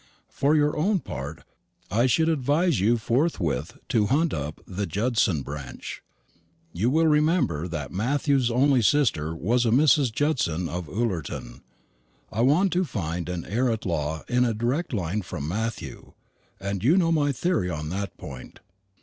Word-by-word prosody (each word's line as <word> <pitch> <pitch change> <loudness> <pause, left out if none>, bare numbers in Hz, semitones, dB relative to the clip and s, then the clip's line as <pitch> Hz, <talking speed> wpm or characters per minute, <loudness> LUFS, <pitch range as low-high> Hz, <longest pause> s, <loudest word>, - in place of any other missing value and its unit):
For 145 +3 +2
your 150 -1 +2
own 190 +6 +1
part, 70 +4 -7 0.5
I 120 +5 +3
should 160 +6 +3
advise 155 - +2
you 115 +5 +3
forthwith 115 - -1
to 105 -3 +2
hunt 155 +7 +2
up 75 0 -4
the 100 +1 -4
Judson 105 - +1
branch. 70 -3 -7 0.7
You 105 +8 +1
will 160 +4 +3
remember 150 - +2
that 85 - -5
Matthew's 135 +5 +1
only 130 +2 +3
sister 100 - +2
was 115 +9 +1
a 115 - +2
Mrs. 135 0 +4
Judson 110 - 0
of 85 -2 -5
Ullerton. 80 - -3 0.7
I 110 - -1
want 165 +10 +3
to 180 +1 +2
find 90 - -4
an 90 -2 -4
heir 120 +5 0
at 110 - -3
law 80 -3 -2
in 125 0 +2
a 115 -3 0
direct 125 +10 -1
line 100 -2 -1
from 85 -6 -6
Matthew; 110 +5 -4 0.5
and 100 0 -3
you 155 +10 +4
know 170 -3 +3
my 145 -3 +2
theory 155 - 0
on 75 -2 -4
that 95 +1 -4
point. 65 -2 -10
115 Hz, 160 wpm, -25 LUFS, 85-145 Hz, 0.7 s, Mrs